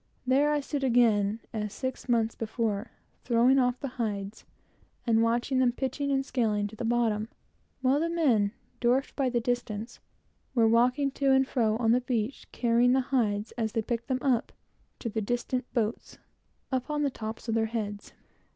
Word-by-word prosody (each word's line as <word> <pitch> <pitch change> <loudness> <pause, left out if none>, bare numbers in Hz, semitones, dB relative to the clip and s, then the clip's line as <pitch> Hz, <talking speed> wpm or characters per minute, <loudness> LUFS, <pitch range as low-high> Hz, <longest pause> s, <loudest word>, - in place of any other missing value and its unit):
There 275 +4 +3
I 295 -1 +1
stood 280 0 -3
again, 225 -4 +3
as 210 -2 -3
six 260 +2 -5
months 230 -2 +2
before, 220 -1 -2 0.3
throwing 245 +3 +4
off 250 -1 +1
the 280 - -3
hides, 205 -2 -4 0.6
and 225 -2 +3
watching 240 +3 +1
them, 250 -2 +4
pitching 270 +3 -2
and 270 0 +1
scaling, 215 -6 0
to 220 - -12
the 225 - -5
bottom, 225 -2 +1 0.5
while 265 +2 +3
the 335 +2 0
men, 250 -12 +2 0.3
dwarfed 255 +3 +1
by 270 -3 +1
the 240 -1 +1
distance, 235 -2 -3 0.6
were 230 -2 +5
walking 250 +5 +3
to 275 0 0
and 265 0 +4
fro 220 -5 +1
on 225 -1 +2
the 250 +2 +3
beach, 245 0 -2
carrying 240 +1 +3
the 265 - +3
hides, 210 -4 +1
as 220 -1 -1
they 225 - 0
picked 235 +1 -3
them 260 -2 -1
up, 255 -5 +1 0.5
to - - -5
the 220 0 -2
distant 245 +3 -2
boats, 225 -2 -2 0.5
upon 295 +3 -1
the 280 - +1
tops 220 0 -7
of 225 - 0
their 225 0 +1
heads. 210 -3 -5
240 Hz, 175 wpm, -28 LUFS, 220-260 Hz, 0.6 s, were